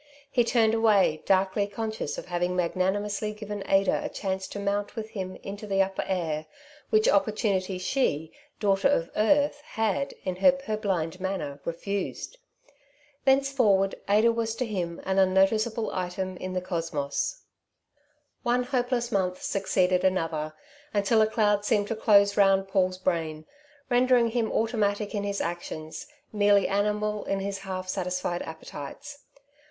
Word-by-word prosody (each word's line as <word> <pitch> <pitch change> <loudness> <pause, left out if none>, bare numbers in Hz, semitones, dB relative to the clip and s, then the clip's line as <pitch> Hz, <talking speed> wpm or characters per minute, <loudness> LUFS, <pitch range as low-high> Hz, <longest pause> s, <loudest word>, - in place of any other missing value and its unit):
He 245 -3 +3
turned 225 -2 +3
away, 210 -8 +3
darkly 195 +1 +2
conscious 220 -5 -4
of - - -6
having 175 +1 -1
magnanimously 200 +4 -1
given 210 -1 -6
Ada 195 0 +3
a - - -3
chance 190 -1 -3
to - - -7
mount 200 0 -2
with 220 -1 -5
him 185 -4 -5
into 205 +2 -7
the 195 -1 +3
upper 190 0 -3
air, 160 -4 -2 0.4
which 435 +1 +3
opportunity 210 - +1
she, 180 - 0 0.3
daughter 200 +3 +3
of 170 -12 +1
earth, 290 +6 +2
had, 225 -1 -1
in 185 -1 -3
her 275 +9 +6
purblind 205 -10 -2
manner, 160 -7 -3
refused. 200 - -4 0.9
Thenceforward 265 -8 +3 0.2
Ada 215 +3 +5
was 225 -1 -2
to 250 +2 -1
him 175 -6 -3
an 190 0 +1
unnoticeable 215 +4 +2
item 185 0 -3
in 185 0 -5
the 185 - -1
cosmos. 165 - -3 1.0
One 245 0 +1
hopeless 245 -2 -1
month 185 -3 -1
succeeded 185 -2 +1
another, 165 -4 0 0.4
until 205 +2 +3
a 215 - +4
cloud 210 -2 +2
seemed 210 -1 +1
to 225 - -1
close 200 -2 +4
round 195 -1 +4
Paul's 185 -1 +1
brain, 165 -4 -2 0.4
rendering 245 -1 +4
him 225 -1 -1
automatic 210 -2 0
in 205 -1 -1
his 200 0 -2
actions, 160 -2 -5 0.3
merely 205 -1 +4
animal 210 +1 0
in 195 - -1
his 195 0 -3
half 185 -1 -5
satisfied 180 -1 -2
appetites. 160 - -9
200 Hz, 140 wpm, -27 LUFS, 185-220 Hz, 1.0 s, her